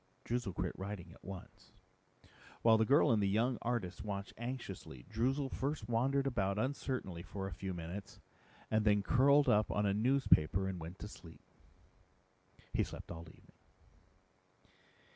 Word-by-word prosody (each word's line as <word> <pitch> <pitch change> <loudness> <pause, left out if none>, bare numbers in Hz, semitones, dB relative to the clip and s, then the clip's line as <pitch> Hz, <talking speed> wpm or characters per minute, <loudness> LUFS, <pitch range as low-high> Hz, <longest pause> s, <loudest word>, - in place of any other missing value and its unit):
Droozle 120 -6 -2
quit 90 0 -1
writing 95 -2 -5
at - - -17
once. 95 0 -10 0.9
While 110 -1 +6
the 110 - +3
girl 140 0 +5
and 110 -2 +3
the 100 - +2
young 115 +5 +1
artist 110 -8 -2
watched 100 -2 -4
anxiously, 115 - -6
Droozle 130 +6 0
first 140 -5 -2
wandered 135 +4 +2
about 100 -7 0
uncertainly 130 -7 -2
for 95 +2 -5
a 95 - -4
few 95 +2 -4
minutes 90 +3 -6 0.5
and 110 0 +3
then 105 -1 +4
curled 140 +5 +5
up 105 +1 +4
on 105 - +1
a 100 - +3
newspaper 105 - +3
and 95 -2 -3
went 85 +3 -7
to 105 - -4
sleep. 85 -5 -13 1.3
He - - +3
slept - - -8
all 85 0 -7
evening. - - -19
105 Hz, 150 wpm, -35 LUFS, 95-125 Hz, 1.3 s, While